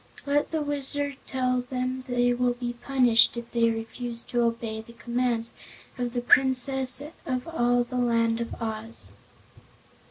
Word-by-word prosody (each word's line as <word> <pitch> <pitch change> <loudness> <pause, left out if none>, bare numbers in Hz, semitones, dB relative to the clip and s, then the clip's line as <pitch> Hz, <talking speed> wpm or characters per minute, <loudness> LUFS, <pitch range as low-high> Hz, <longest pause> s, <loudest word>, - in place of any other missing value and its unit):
"Let 290 +1 +1
the 315 -2 -1
Wizard 285 -1 +1
tell 255 -1 0
them 255 +1 -3
they 245 -1 +2
will 245 0 +1
be 240 0 -4
punished 245 -2 +3
if 235 0 -7
they 230 -1 +3
refuse 230 +1 -4
to 240 - -1
obey 230 -1 -1
the 235 +1 -15
commands 235 -1 -1 0.4
of 245 -1 -3
the 245 - -1
Princess 260 +1 +3 0.2
of 255 0 -2
all 245 -6 +2
the 250 +1 -5
Land 230 -1 +2
of 235 - -5
Oz." 225 0 -2
245 Hz, 150 wpm, -26 LUFS, 235-260 Hz, 0.4 s, punished